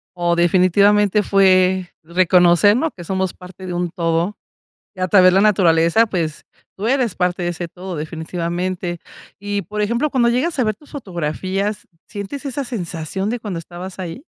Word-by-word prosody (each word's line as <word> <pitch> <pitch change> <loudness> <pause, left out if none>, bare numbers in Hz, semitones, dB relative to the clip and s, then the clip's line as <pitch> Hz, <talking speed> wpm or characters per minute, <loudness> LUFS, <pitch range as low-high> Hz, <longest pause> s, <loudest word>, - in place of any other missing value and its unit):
Oh, 175 -1 +1
definitivamente 200 +4 +3
fue, 185 -2 +3
reconocer, 180 +3 +4
¿no?, 315 +4 0
que 175 - -11
somos 190 +1 -2
parte 180 +1 -12
de 180 - -4
un 175 0 -1
todo, 170 +3 -1 0.6
y - - -13
a 185 - 0
través 185 -1 +6
de - - +1
la 195 - +5
naturaleza, 185 0 +4
pues, 165 -6 -3 0.3
tú 210 +4 -3
eres 255 -5 +1
parte 180 0 -1
de 175 - 0
ese 175 0 -4
todo 180 +1 -8
definitivamente, 175 +3 -4 0.4
y 205 0 -2
por 210 +4 -5
ejemplo, 235 +8 0
cuando 240 -3 +2
llegas 270 +7 0
a 255 - +2
ver 215 -1 0
tus 295 - -21
fotografías, 195 - -3 0.2
¿sientes 210 +8 -7
esa 275 +2 -3
sensación 190 - -4
de 240 +2 -2
cuando 200 -7 -5
estabas 180 +3 -9
ahí? 185 - -6
185 Hz, 170 wpm, -19 LUFS, 175-210 Hz, 0.6 s, través